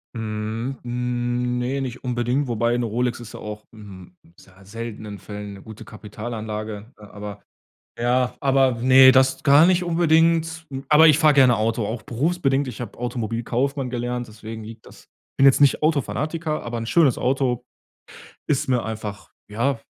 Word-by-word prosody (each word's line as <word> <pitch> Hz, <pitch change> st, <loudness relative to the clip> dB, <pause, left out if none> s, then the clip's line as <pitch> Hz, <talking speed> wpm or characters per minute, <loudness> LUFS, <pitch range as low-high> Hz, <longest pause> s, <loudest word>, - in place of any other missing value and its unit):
Mhm. 110 Hz, +3 st, -4 dB, 0.8 s
Ne, 130 Hz, +3 st, -2 dB
nicht 125 Hz, -2 st, -6 dB
unbedingt. 125 Hz, +2 st, -1 dB
Wobei 120 Hz, 0 st, 0 dB
'ne 120 Hz, -, -1 dB
Rolex 120 Hz, +2 st, -1 dB
ist 115 Hz, -2 st, -10 dB
ja -, -, -8 dB
auch, 105 Hz, 0 st, -8 dB
mm, 100 Hz, -5 st, -12 dB, 0.2 s
in 85 Hz, -, -24 dB
sehr 95 Hz, +1 st, -19 dB
seltenen 110 Hz, -1 st, -7 dB
Fällen 105 Hz, -1 st, -8 dB
'ne 100 Hz, -, -12 dB
gute 110 Hz, +1 st, -11 dB
Kapitalanlage. 110 Hz, +1 st, -7 dB
Äh, 105 Hz, -, -16 dB
aber, 105 Hz, 0 st, -9 dB, 0.6 s
ja 125 Hz, +1 st, +1 dB
aber, 135 Hz, -1 st, +3 dB
ne, 130 Hz, +1 st, +7 dB
das 130 Hz, 0 st, +3 dB
gar 145 Hz, +3 st, +6 dB
nicht 180 Hz, -1 st, +2 dB
unbedingt, 165 Hz, -1 st, +2 dB
m 135 Hz, +1 st, -6 dB
aber 155 Hz, +2 st, +7 dB
ich 150 Hz, -1 st, +5 dB
fahre 155 Hz, -2 st, +5 dB
gerne 130 Hz, -4 st, +5 dB
Auto, 110 Hz, 0 st, -1 dB
auch 110 Hz, +1 st, -5 dB
berufsbedingt. 135 Hz, -, 0 dB
Ich 120 Hz, -, -8 dB
habe 120 Hz, -4 st, -8 dB
Automobilkaufmann 120 Hz, +3 st, -2 dB
gelernt, 120 Hz, 0 st, -3 dB
deswegen 110 Hz, +1 st, -9 dB
liegt 110 Hz, +1 st, -12 dB
das -, -, -16 dB, 0.3 s
bin 135 Hz, -, +5 dB
jetzt 135 Hz, -, +5 dB
nicht 140 Hz, +1 st, +4 dB
Autofanatiker, 155 Hz, +1 st, -1 dB
aber 120 Hz, 0 st, -5 dB
'n 115 Hz, -, -5 dB
schönes 145 Hz, -1 st, +3 dB
Auto 125 Hz, -2 st, 0 dB, 0.8 s
ist 145 Hz, -3 st, 0 dB
mir 125 Hz, -2 st, +1 dB
einfach 105 Hz, -2 st, -7 dB, 0.2 s
ja, 120 Hz, +4 st, -1 dB
120 Hz, 165 wpm, -22 LUFS, 110-135 Hz, 0.8 s, ne